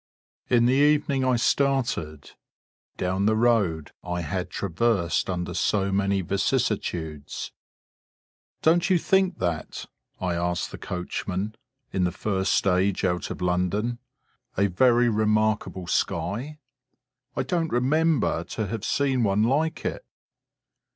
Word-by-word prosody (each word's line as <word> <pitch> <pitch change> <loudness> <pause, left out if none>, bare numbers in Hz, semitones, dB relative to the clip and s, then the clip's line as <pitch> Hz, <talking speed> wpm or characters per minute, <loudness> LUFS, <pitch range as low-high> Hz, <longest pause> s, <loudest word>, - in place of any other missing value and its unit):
In 120 -1 +4
the 125 - +4
evening 145 -1 +3
I 130 -1 +3
started,... 120 - 0 0.7
down 95 +2 0
the 110 - +3
road 105 -10 +1
I 90 -1 -3
had 90 +3 -3
traversed 95 -2 0
under 90 -1 -3
so 100 -2 +1
many 100 0 +1
vicissitudes. 80 -4 -2 1.1
"Don't 170 +4 +3
you 185 - +5
think 190 +2 +2
that," 85 -4 -3 0.3
I 90 -1 -1
asked 85 0 -1
the - - -8
coachman, 95 +3 -4 0.4
in 95 - +1
the 90 - 0
first 95 +1 -1
stage 95 0 +2
out 90 -1 -1
of - - -5
London, 90 +7 0 0.6
"a 100 +1 +3
very 120 +5 +4
remarkable 110 -3 +1
sky? 120 - -2 0.8
I - - 0
don't 170 -3 -1
remember 150 +4 +2
to 110 - -1
have 110 +1 -4
seen 135 -1 +1
one 100 0 +2
like 150 +7 0
it." - - -3
105 Hz, 125 wpm, -25 LUFS, 90-125 Hz, 1.1 s, you